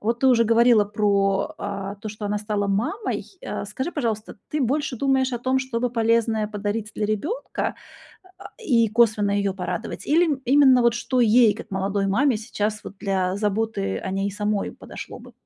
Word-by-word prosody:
Вот 230 Hz, +2 st, -1 dB
ты 265 Hz, -, +3 dB
уже 230 Hz, -2 st, +5 dB
говорила 230 Hz, -1 st, +5 dB
про, 200 Hz, +5 st, +1 dB
а, 200 Hz, -1 st, -4 dB
то, 215 Hz, +2 st, -7 dB
что 210 Hz, 0 st, -7 dB
она 205 Hz, 0 st, -1 dB
стала 210 Hz, -1 st, -2 dB
мамой. 240 Hz, -, -1 dB, 0.2 s
Э, -, -, -5 dB
скажи, 260 Hz, -, -4 dB
пожалуйста, 225 Hz, -7 st, -3 dB
ты 300 Hz, -, -2 dB
больше 280 Hz, +1 st, 0 dB
думаешь 265 Hz, 0 st, +1 dB
о 240 Hz, -, -2 dB
том, 260 Hz, +2 st, +1 dB
что 260 Hz, -3 st, -3 dB
бы 245 Hz, -1 st, 0 dB
полезное 225 Hz, -2 st, +1 dB
подарить 210 Hz, +1 st, -3 dB
для 215 Hz, -, -2 dB
ребёнка, 290 Hz, -, -2 dB, 0.6 s
а, -, -, -10 dB
и 245 Hz, -, +2 dB
косвенно 215 Hz, -2 st, +3 dB
её 200 Hz, -1 st, 0 dB
порадовать? 180 Hz, -2 st, -5 dB
Или, 330 Hz, +4 st, +4 dB
м, 275 Hz, -2 st, -2 dB
именно 265 Hz, -1 st, +6 dB
вот 235 Hz, -1 st, +3 dB
что 250 Hz, +1 st, -1 dB
ей, 230 Hz, -1 st, +5 dB
как 220 Hz, -, -10 dB
молодой 195 Hz, +1 st, -1 dB
маме, 245 Hz, +5 st, +2 dB
сейчас 215 Hz, -1 st, -3 dB
вот 200 Hz, -, -9 dB
для 190 Hz, -2 st, 0 dB
заботы 205 Hz, -1 st, -1 dB
о 190 Hz, -, -5 dB
ней 195 Hz, +1 st, -1 dB
самой 210 Hz, 0 st, -1 dB
подошло -, -, -9 dB
бы? -, -, -14 dB
220 Hz, 185 wpm, -23 LUFS, 205-245 Hz, 0.6 s, именно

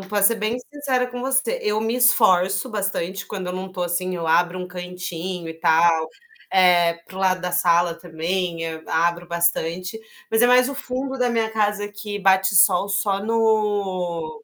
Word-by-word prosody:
pra 200 Hz, +1 st, -2 dB
ser 230 Hz, +3 st, +5 dB
bem 215 Hz, +2 st, -2 dB, 0.2 s
sincera 270 Hz, -4 st, -1 dB
com 245 Hz, 0 st, -7 dB
você. 265 Hz, -2 st, 0 dB
Eu 210 Hz, +1 st, 0 dB
me 225 Hz, +1 st, -1 dB
esforço 195 Hz, -4 st, +3 dB
bastante 195 Hz, -2 st, -3 dB
quando 190 Hz, -3 st, -6 dB
eu -, -, -3 dB
não 185 Hz, +1 st, -6 dB
tô, 180 Hz, -, -4 dB
assim, 180 Hz, +1 st, -2 dB
eu 170 Hz, -2 st, -4 dB
abro 175 Hz, +3 st, +2 dB
um 180 Hz, 0 st, -6 dB
cantinho 180 Hz, -1 st, -6 dB
e 160 Hz, -, -6 dB
tal, 160 Hz, 0 st, +3 dB, 0.5 s
eh, 175 Hz, -2 st, +4 dB
para -, -, -14 dB
o -, -, -6 dB
lado 185 Hz, -1 st, +1 dB
da 180 Hz, 0 st, -3 dB
sala 175 Hz, -1 st, +2 dB
também, 170 Hz, 0 st, -3 dB
hã 160 Hz, -1 st, -6 dB
abro 170 Hz, +1 st, 0 dB
bastante, 170 Hz, +3 st, -1 dB, 0.3 s
mas 225 Hz, 0 st, +3 dB
é 245 Hz, -, +5 dB
mais 250 Hz, 0 st, +5 dB
o -, -, -5 dB
fundo 265 Hz, 0 st, -4 dB
da 250 Hz, -1 st, +1 dB
minha 225 Hz, -2 st, 0 dB
casa 210 Hz, -1 st, 0 dB
que 210 Hz, 0 st, -6 dB
bate 190 Hz, 0 st, +3 dB
sol 195 Hz, 0 st, +5 dB
só 195 Hz, 0 st, 0 dB
no 205 Hz, -5 st, -1 dB
190 Hz, 185 wpm, -22 LUFS, 175-215 Hz, 0.5 s, ser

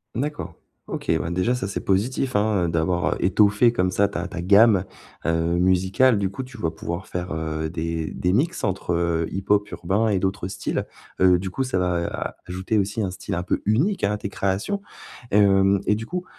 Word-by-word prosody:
D'accord. 150 Hz, +4 st, -3 dB, 0.3 s
OK, -, -, -3 dB
bah 80 Hz, -, -3 dB
déjà 90 Hz, +8 st, +1 dB
ça, 125 Hz, -6 st, -2 dB
c'est 100 Hz, -, -4 dB
positif, 125 Hz, +6 st, 0 dB
hein. 105 Hz, -3 st, +2 dB
Heu, -, -, -2 dB
d'avoir 85 Hz, +2 st, 0 dB
heu, -, -, -6 dB
étoffé 105 Hz, +5 st, +4 dB
comme 90 Hz, -4 st, +1 dB
ça 100 Hz, +2 st, +3 dB
ta 100 Hz, -, -4 dB
ta 90 Hz, -3 st, -5 dB
gamme, 100 Hz, +1 st, +5 dB, 0.4 s
heu, 85 Hz, -, +2 dB, 0.3 s
musicale. 95 Hz, +7 st, +3 dB
Du 100 Hz, -1 st, 0 dB
coup, 115 Hz, +7 st, -5 dB
tu 125 Hz, -1 st, -12 dB
vas 80 Hz, -7 st, -1 dB
pouvoir 85 Hz, +3 st, -5 dB
faire, 90 Hz, -1 st, -4 dB
heu, 80 Hz, 0 st, -3 dB
des 80 Hz, -1 st, -3 dB
des 90 Hz, -, -1 dB
mix 155 Hz, -, 0 dB
entre 95 Hz, -3 st, -1 dB
heu, 85 Hz, -1 st, 0 dB
hip-hop 100 Hz, +2 st, 0 dB
urbain 100 Hz, +6 st, 0 dB
et 105 Hz, -3 st, +2 dB
d'autres 95 Hz, -1 st, -2 dB
styles. 95 Hz, -, -3 dB, 0.3 s
Heu, 90 Hz, -1 st, +6 dB
du 95 Hz, +1 st, -4 dB
coup, 135 Hz, +8 st, -2 dB
ça 130 Hz, -7 st, -1 dB
va 90 Hz, -2 st, 0 dB
a -, -, -4 dB
ajouter 95 Hz, +5 st, -2 dB
aussi 100 Hz, +2 st, 0 dB
un 95 Hz, -3 st, -1 dB
style 95 Hz, +1 st, -5 dB
un 90 Hz, -, -2 dB
peu -, -, -1 dB
unique, 140 Hz, -, +2 dB
hein, 100 Hz, -, +1 dB
à -, -, -2 dB
tes 100 Hz, -, -5 dB
créations. 100 Hz, -, -1 dB, 0.5 s
Et -, -, +2 dB
hem, 95 Hz, -1 st, +4 dB
et 105 Hz, -, +3 dB
du 110 Hz, +2 st, -4 dB
coup, 180 Hz, +8 st, -4 dB
95 Hz, 210 wpm, -23 LUFS, 90-105 Hz, 0.5 s, Heu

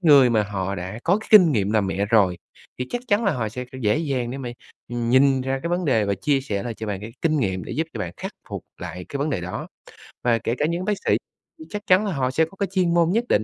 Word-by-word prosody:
người 140 Hz, -7 st, +7 dB
mà 110 Hz, -2 st, +3 dB
họ 100 Hz, -2 st, -3 dB
đã 95 Hz, +3 st, -5 dB
có 190 Hz, +5 st, +3 dB
cái -, -, -12 dB
kinh 185 Hz, -7 st, +8 dB
nghiệm 105 Hz, -5 st, +1 dB
làm 105 Hz, -2 st, +2 dB
mẹ 95 Hz, +1 st, 0 dB
rồi, 100 Hz, -6 st, +3 dB, 0.4 s
thì 125 Hz, -, -2 dB
chắc 245 Hz, -, -2 dB
chắn 210 Hz, +1 st, +3 dB
là 195 Hz, -, +3 dB
họ 120 Hz, -6 st, -2 dB
sẽ 125 Hz, +4 st, -6 dB, 0.2 s
dễ 105 Hz, +4 st, +2 dB
dàng 135 Hz, -7 st, -1 dB
để 135 Hz, -, -5 dB
mà, 130 Hz, -3 st, -5 dB, 0.4 s
ừm, 120 Hz, -1 st, -2 dB
nhìn 135 Hz, +1 st, +5 dB
ra 135 Hz, +1 st, -2 dB
cái 170 Hz, -, -2 dB
vấn 175 Hz, +1 st, 0 dB
đề 115 Hz, -8 st, +3 dB
và 100 Hz, 0 st, 0 dB
chia 135 Hz, +8 st, +1 dB
sẻ 105 Hz, -7 st, -3 dB
lại 120 Hz, -2 st, -4 dB
cho 110 Hz, -, -6 dB
bạn 100 Hz, -2 st, -3 dB
cái 110 Hz, +2 st, -8 dB
kinh 155 Hz, -1 st, +2 dB
nghiệm, 95 Hz, -6 st, -1 dB
để -, -, -6 dB
giúp 160 Hz, +2 st, -1 dB
cho 115 Hz, -, -4 dB
bạn 90 Hz, -4 st, -3 dB
khắc -, -, -6 dB, 0.2 s
phục -, -, -6 dB
lại 90 Hz, +1 st, -6 dB
cái 140 Hz, -, -4 dB
vấn 150 Hz, +2 st, 0 dB
đề 100 Hz, -, -1 dB
đó. 90 Hz, +1 st, -5 dB, 0.6 s
Và 120 Hz, -1 st, +3 dB
kể 115 Hz, -, -1 dB
cả 150 Hz, -, +1 dB
những 170 Hz, +3 st, -1 dB
bác 210 Hz, -, +2 dB
sĩ -, -, +4 dB, 0.4 s
thì 315 Hz, -, -9 dB
chắc 210 Hz, 0 st, -4 dB
chắn 185 Hz, +3 st, +5 dB
là 200 Hz, -, -1 dB
họ 130 Hz, -3 st, 0 dB
sẽ 160 Hz, +4 st, +3 dB
có 165 Hz, -, -16 dB
cái 200 Hz, -, +1 dB
chuyên 180 Hz, -3 st, +2 dB
môn 170 Hz, -1 st, +4 dB
nhất 230 Hz, +5 st, +2 dB
định, 105 Hz, -, +3 dB
130 Hz, 290 wpm, -23 LUFS, 105-165 Hz, 0.6 s, kinh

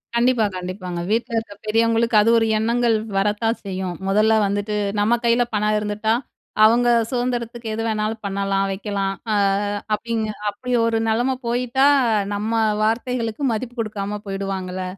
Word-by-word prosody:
கண்டிப்பா 235 Hz, -2 st, +3 dB
கண்டிப்பாங்க. 180 Hz, -1 st, -5 dB
வீட்ல 230 Hz, +2 st, 0 dB
இருக்க 225 Hz, -2 st, -4 dB
பெரியவங்களுக்கு, 230 Hz, +1 st, +2 dB
அது 225 Hz, -, +3 dB
ஒரு 225 Hz, -, +1 dB
எண்ணங்கள் 235 Hz, +1 st, +2 dB, 0.2 s
வரத்தான் 210 Hz, +3 st, +1 dB
செய்யும். 185 Hz, -2 st, -4 dB
மொதல்ல 215 Hz, +3 st, +3 dB
வந்துட்டு, 205 Hz, +1 st, -2 dB, 0.2 s
நம்ம 230 Hz, +3 st, +3 dB
கையில 235 Hz, +1 st, +4 dB
பணம் 210 Hz, +1 st, +1 dB
இருந்துட்டா, 210 Hz, +1 st, -1 dB, 0.5 s
அவங்க 240 Hz, +2 st, +4 dB, 0.2 s
சுதந்திரத்துக்கு 240 Hz, -2 st, -2 dB
எது 225 Hz, +1 st, -2 dB
வேணாலும் 215 Hz, 0 st, -2 dB
பண்ணலாம், 195 Hz, 0 st, 0 dB
வைக்கலாம். 195 Hz, -1 st, -2 dB, 0.2 s
ஆ -, -, +2 dB, 0.6 s
அப்படிங்க 225 Hz, 0 st, -1 dB, 0.2 s
அப்படி 250 Hz, +5 st, -5 dB
ஒரு 225 Hz, -1 st, +1 dB
நெலைம 245 Hz, +4 st, +1 dB
போயிட்டா, 250 Hz, +3 st, +2 dB, 0.5 s
நம்ம 215 Hz, +2 st, -2 dB, 0.3 s
வார்த்தைகளுக்கு 230 Hz, +2 st, -1 dB
மதிப்பு 245 Hz, +2 st, -5 dB
குடுக்காம 210 Hz, -1 st, -3 dB
போயிடுவாங்கள்ல! 190 Hz, -1 st, -4 dB
220 Hz, 130 wpm, -21 LUFS, 205-235 Hz, 0.6 s, கையில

